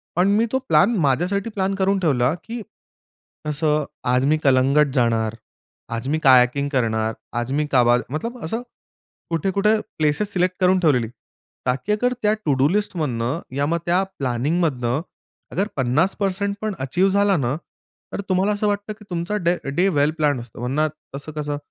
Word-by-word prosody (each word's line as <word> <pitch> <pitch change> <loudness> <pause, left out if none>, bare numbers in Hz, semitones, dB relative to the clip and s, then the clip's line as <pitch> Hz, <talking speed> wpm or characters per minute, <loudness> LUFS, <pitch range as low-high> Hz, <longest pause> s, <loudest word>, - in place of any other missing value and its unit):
पण 180 +3 +3
मी 230 - +3
तो 265 - +1
प्लॅन 180 +10 +4
माझ्यासाठी 180 - 0
प्लॅन 195 -2 -1
करून 195 0 +1
ठेवला 135 -5 +2
की 230 +1 -6 0.9
असं 150 0 +1 0.3
आज 125 +1 +3
मी 155 +2 +3
कलंगट 135 +2 +4
जाणार, 115 -2 +1 0.6
आज 115 +3 -4
मी 155 +2 +1
कयाकिंग 130 +2 +5
करणार, 110 -4 0 0.3
आज 120 +2 -3
मी 150 +1 +1
काबाद 120 -2 +4
मतलब 230 - -4
असं 225 +9 -2 0.7
कुठे-कुठे 195 +6 +1 0.2
प्लेसेस 155 +7 0
सिलेक्ट 180 0 +1
करून 185 +1 +4
ठेवलेली, 135 -10 +2 0.6
ताकी 125 +10 -1
अगर 245 +4 +1
त्या 210 0 +3
टू-डू 135 -1 +3
लिस्टमधनं, 155 - -1 0.2
या 140 - +2
मग 165 +3 +1
त्या 180 +2 +2 0.2
प्लॅनिंगमधनं 135 0 0 0.5
अगर 200 +3 0
50% 190 +9 0
पण 215 -2 -2
अचीव्ह 175 +9 +1
झालं 200 -3 +3
ना, 125 +2 0 0.6
तर - - -2
तुम्हाला 190 +2 +2
असं 210 0 0
वाटतं 205 +1 -2
की 210 - -14
तुमचा 175 +4 -2
डे 175 +1 +2 0.2
डे 185 +4 +3
वेल 145 +2 +3
प्लॅन्ड 145 -5 +1
असतो. 120 0 -11
वरना 150 +5 +1 0.3
तसं 145 +3 -6
कसं 145 -1 -3
155 Hz, 160 wpm, -22 LUFS, 130-195 Hz, 0.9 s, कयाकिंग